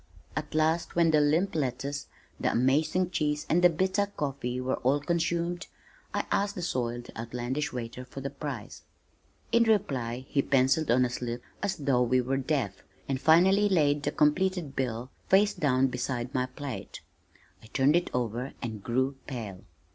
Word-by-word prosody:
At -, -, -4 dB
last 160 Hz, +2 st, +1 dB
when 170 Hz, -1 st, +4 dB
the 155 Hz, -1 st, +4 dB
limp 160 Hz, +7 st, +2 dB
lettuce, 140 Hz, 0 st, -2 dB, 0.3 s
the -, -, +1 dB
amazing 155 Hz, +8 st, +2 dB
cheese 150 Hz, -2 st, 0 dB
and 175 Hz, +3 st, +2 dB
the 180 Hz, -, +9 dB
bitter 190 Hz, +4 st, +1 dB
coffee 135 Hz, -9 st, -3 dB
were 130 Hz, +1 st, -1 dB
all 135 Hz, +3 st, +2 dB
consumed, 170 Hz, +2 st, -1 dB, 0.4 s
I -, -, -1 dB
asked 200 Hz, 0 st, +1 dB
the 180 Hz, -, -4 dB
soiled, 120 Hz, -6 st, -2 dB
outlandish 125 Hz, +6 st, -3 dB
waiter 125 Hz, +1 st, -6 dB
the 135 Hz, 0 st, -5 dB
price. 140 Hz, -5 st, -6 dB, 0.7 s
In 235 Hz, -, +5 dB
reply 135 Hz, -, +1 dB
he 140 Hz, -, +2 dB
pencilled 135 Hz, +4 st, +2 dB
on 125 Hz, +2 st, +4 dB
a -, -, -1 dB
slip 120 Hz, -1 st, -4 dB, 0.2 s
as 200 Hz, -2 st, 0 dB
though 135 Hz, -5 st, +1 dB
we 125 Hz, +1 st, +3 dB
were 130 Hz, +2 st, 0 dB
deaf, 130 Hz, -9 st, -1 dB, 0.3 s
and 135 Hz, -1 st, -2 dB
finally 190 Hz, +6 st, +5 dB
laid 150 Hz, -6 st, +3 dB
the -, -, -1 dB
completed 170 Hz, -1 st, +1 dB
bill 125 Hz, -1 st, -2 dB, 0.2 s
face 200 Hz, +2 st, +5 dB
down 135 Hz, -3 st, +2 dB
beside 125 Hz, -1 st, -2 dB
my 125 Hz, -1 st, 0 dB
plate. 130 Hz, -1 st, -7 dB, 0.6 s
I -, -, -14 dB
turned 135 Hz, +6 st, +3 dB
it 175 Hz, 0 st, +1 dB
over 125 Hz, +2 st, -2 dB
and 110 Hz, -3 st, -5 dB
grew 130 Hz, +3 st, 0 dB
pale. 110 Hz, -8 st, -6 dB
140 Hz, 160 wpm, -29 LUFS, 125-165 Hz, 0.7 s, the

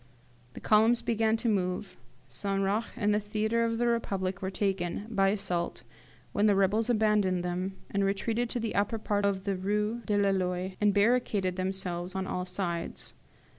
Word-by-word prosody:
"The -, -, -8 dB
columns 220 Hz, +2 st, +4 dB
began 225 Hz, -1 st, +2 dB
to 235 Hz, -, -2 dB
move, 185 Hz, -2 st, -1 dB, 0.3 s
St. 195 Hz, +11 st, -2 dB
Roch 210 Hz, +4 st, 0 dB
and 210 Hz, -1 st, +1 dB
the 210 Hz, -, +2 dB
theatre 215 Hz, +2 st, 0 dB
of 230 Hz, 0 st, -1 dB
the 240 Hz, -, +1 dB
Republic 195 Hz, -5 st, -1 dB
were 190 Hz, -, -2 dB
taken, 190 Hz, -1 st, -2 dB
by 195 Hz, -3 st, +3 dB
assault, 190 Hz, -4 st, -2 dB, 0.5 s
when 205 Hz, +1 st, +2 dB
the 205 Hz, -, +4 dB
rebels 205 Hz, +4 st, +2 dB
abandoned 210 Hz, -5 st, +2 dB
them, 180 Hz, +2 st, -2 dB, 0.2 s
and 200 Hz, 0 st, +1 dB
retreated 225 Hz, +4 st, 0 dB
to 245 Hz, -, -2 dB
the 225 Hz, -1 st, -2 dB
upper 205 Hz, +3 st, +1 dB
part 205 Hz, -1 st, 0 dB
of 190 Hz, -1 st, -1 dB
the 200 Hz, -1 st, -1 dB
Rue 210 Hz, +5 st, -1 dB
de 210 Hz, -, +2 dB
la 200 Hz, -1 st, +3 dB
Loi, 185 Hz, 0 st, -1 dB
and 210 Hz, 0 st, +5 dB
barricaded 205 Hz, -3 st, +2 dB
themselves 185 Hz, -1 st, -2 dB
on 190 Hz, 0 st, -1 dB
all 180 Hz, -1 st, -3 dB
sides. 180 Hz, -2 st, -4 dB
200 Hz, 175 wpm, -29 LUFS, 185-215 Hz, 0.5 s, and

